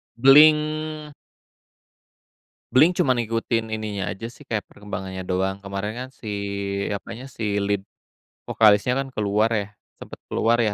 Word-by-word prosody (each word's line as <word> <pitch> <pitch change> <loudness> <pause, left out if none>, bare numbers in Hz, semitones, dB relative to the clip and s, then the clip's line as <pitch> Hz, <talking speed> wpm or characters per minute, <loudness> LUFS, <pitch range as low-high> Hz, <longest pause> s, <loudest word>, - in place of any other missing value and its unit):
Blink 150 +3 +4 1.6
Blink-182 160 +7 +5
cuma 130 - +3
ngikutin 115 0 -1
ininya 105 -3 -3
aja 115 +4 -6
sih, 120 - -14
kayak 110 -3 -3
perkembangannya 95 -2 -7
doang, 95 +2 -2
kemarin 100 +2 -4
kan 130 +1 -6
si 115 - -13 0.6
apanya, 115 +4 -6
si 115 - -7 0.2
lead 100 0 0 0.7
vokalisnya 110 +3 +4
kan 135 0 -2
keluar 105 +1 +1
ya, 105 -2 0 0.4
sempet - - -9
keluar 115 +1 +1
ya, 110 -3 +1
110 Hz, 130 wpm, -23 LUFS, 100-130 Hz, 1.6 s, Blink-182